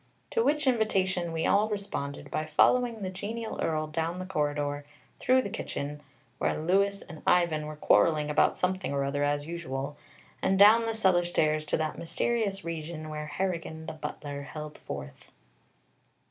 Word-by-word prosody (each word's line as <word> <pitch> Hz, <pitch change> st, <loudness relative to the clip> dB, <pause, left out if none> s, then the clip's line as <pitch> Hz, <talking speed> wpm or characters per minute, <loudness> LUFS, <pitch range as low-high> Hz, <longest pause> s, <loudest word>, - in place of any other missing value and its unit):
To 460 Hz, -, +2 dB
which 300 Hz, -3 st, +2 dB
invitation 190 Hz, -8 st, +1 dB
we 165 Hz, 0 st, -1 dB
all 210 Hz, +2 st, +3 dB
responded 140 Hz, -9 st, -4 dB
by 155 Hz, -, -2 dB
following 230 Hz, +7 st, +3 dB
the 185 Hz, -, -2 dB
genial 220 Hz, +4 st, -5 dB
Earl 155 Hz, -1 st, 0 dB
down 165 Hz, +3 st, -2 dB
the 185 Hz, -, -4 dB
corridor, 145 Hz, -4 st, -1 dB, 0.4 s
through 255 Hz, 0 st, +4 dB
the 200 Hz, -, -5 dB
kitchen, 145 Hz, +1 st, -4 dB, 0.4 s
where -, -, +1 dB
Louis 195 Hz, +5 st, +2 dB
and 160 Hz, -, -10 dB
Ivan 170 Hz, -4 st, +3 dB
were 155 Hz, -, -6 dB
quarreling 150 Hz, 0 st, +3 dB
about -, -, +3 dB
something 185 Hz, -3 st, -1 dB
or 140 Hz, 0 st, +1 dB
other, 145 Hz, +1 st, 0 dB
as 145 Hz, 0 st, 0 dB
usual, 145 Hz, -4 st, -4 dB, 0.5 s
and 190 Hz, -, +2 dB
down 220 Hz, +3 st, +7 dB
the 225 Hz, -, -1 dB
cellar 190 Hz, -5 st, +3 dB
stairs 155 Hz, -3 st, +1 dB
to -, -, +1 dB
that 155 Hz, -1 st, -2 dB
mysterious 200 Hz, +2 st, -1 dB
region 160 Hz, -1 st, -5 dB
where 150 Hz, 0 st, -5 dB
Harrigan 160 Hz, 0 st, -3 dB
the -, -, -5 dB
butler 150 Hz, -2 st, -6 dB
held 150 Hz, +1 st, -8 dB
forth. 65 Hz, 0 st, -8 dB
165 Hz, 160 wpm, -29 LUFS, 150-195 Hz, 0.5 s, down